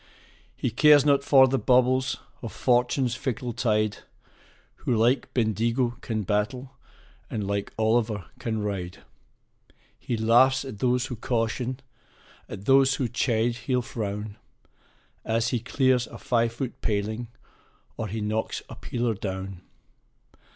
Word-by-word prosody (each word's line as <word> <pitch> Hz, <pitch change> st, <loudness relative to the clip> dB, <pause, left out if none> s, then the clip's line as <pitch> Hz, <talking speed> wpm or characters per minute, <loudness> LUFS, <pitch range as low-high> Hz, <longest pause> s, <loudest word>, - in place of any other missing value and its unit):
He 125 Hz, -, -1 dB
cares 145 Hz, +3 st, +6 dB
not 140 Hz, -1 st, +4 dB
for 135 Hz, -2 st, +6 dB
the 135 Hz, 0 st, 0 dB
bubbles 130 Hz, +1 st, +3 dB, 0.2 s
of 115 Hz, -, -6 dB
Fortune's 125 Hz, 0 st, +1 dB
fickle 125 Hz, -1 st, -3 dB
tide, 110 Hz, -3 st, 0 dB, 0.8 s
Who 120 Hz, -, -1 dB
like 120 Hz, +4 st, +2 dB
Bendigo 120 Hz, +2 st, 0 dB
can 110 Hz, -2 st, -2 dB
battle, 115 Hz, +7 st, -2 dB, 0.5 s
and 105 Hz, -3 st, -3 dB
like 100 Hz, 0 st, -2 dB
Olliver 110 Hz, -3 st, +1 dB
can 110 Hz, -2 st, -2 dB
ride. 95 Hz, -4 st, -4 dB, 1.0 s
He 120 Hz, -, -3 dB
laughs 130 Hz, +5 st, +4 dB
at 110 Hz, -7 st, -8 dB
those 125 Hz, +1 st, +1 dB
who 130 Hz, -2 st, -5 dB
caution, 120 Hz, +3 st, -2 dB, 0.7 s
at 95 Hz, -, -8 dB
those 135 Hz, +1 st, +5 dB
who 130 Hz, -, -1 dB
chide 115 Hz, 0 st, 0 dB
he'll 125 Hz, -2 st, +1 dB
frown, 105 Hz, -3 st, -5 dB, 0.9 s
As 115 Hz, +1 st, 0 dB
he 120 Hz, -, 0 dB
clears 125 Hz, +1 st, +1 dB
a -, -, -10 dB
five 115 Hz, -1 st, +1 dB
foot 130 Hz, +2 st, -6 dB
paling, 110 Hz, +3 st, -2 dB, 0.7 s
or 110 Hz, -, -4 dB
he 110 Hz, +2 st, -4 dB
knocks 110 Hz, +1 st, -2 dB
a -, -, -8 dB
peeler 120 Hz, -1 st, -2 dB
down. 95 Hz, -2 st, -5 dB
120 Hz, 130 wpm, -26 LUFS, 110-130 Hz, 1.0 s, cares